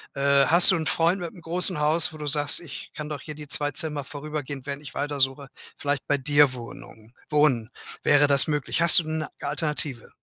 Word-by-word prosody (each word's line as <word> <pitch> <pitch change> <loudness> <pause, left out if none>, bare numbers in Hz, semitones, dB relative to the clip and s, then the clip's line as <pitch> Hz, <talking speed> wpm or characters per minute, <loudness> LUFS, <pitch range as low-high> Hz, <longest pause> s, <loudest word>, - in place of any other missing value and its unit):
Äh, 140 0 +2
hast 170 +4 +7
du - - +2
'n 160 -2 -3
Freund 170 +3 0
mit'm 175 +1 -8
großen 175 0 0
Haus, 155 +3 +1
wo 155 - -11
du 150 - -7
sagst: 145 0 +1
„Ich 165 -5 -11
kann 150 0 -7
doch 145 -3 -6
hier 150 -1 -9
die 150 -1 -11
2 145 +1 0
Zimmer 150 0 -1
vorübergehend, 145 -2 -7
während 140 0 -6
ich 140 - -12
weiter 145 0 -4
suche 135 0 -1 0.3
vielleicht 145 -1 -4
bei 145 - +1
dir 145 0 +2
Wohnung 115 -2 -13 0.2
wohnen?“ 140 -7 +1 0.3
Wäre 145 0 +3
das 140 +1 +5
möglich? 150 +2 -2
Hast 170 - +8
du - - -3
'ne 155 -1 -4
Alternative? 150 -4 -4
145 Hz, 205 wpm, -24 LUFS, 140-155 Hz, 0.3 s, Hast